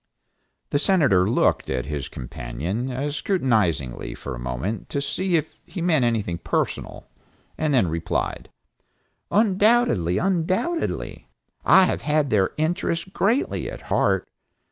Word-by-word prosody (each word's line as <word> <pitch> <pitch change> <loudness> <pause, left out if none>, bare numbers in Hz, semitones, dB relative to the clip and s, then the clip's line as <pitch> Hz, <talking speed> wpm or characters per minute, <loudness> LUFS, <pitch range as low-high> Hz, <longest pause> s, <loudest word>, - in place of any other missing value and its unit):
The 145 - +2
Senator 140 - +3
looked - - +2
at 60 - -1
his 70 -1 -4
companion 70 - -4 0.2
scrutinizingly 105 - 0
for 70 - -6
a - - -7
moment 65 - -4
to 140 - -1
see 180 +5 -1
if 155 - -2
he 190 - -8
meant 165 -6 +2
anything 105 -8 0
personal, - - -3 0.5
and 155 -1 0
then 125 -9 +3
replied, 80 0 -2 0.8
"Undoubtedly, 205 - +3
undoubtedly. 190 - -1 0.4
I 190 - +7
have - - -1
had 150 -1 +1
their 100 -3 +3
interests 165 +1 0
greatly 230 +8 0
at - - -8
heart. - - +2
135 Hz, 120 wpm, -24 LUFS, -, 0.8 s, I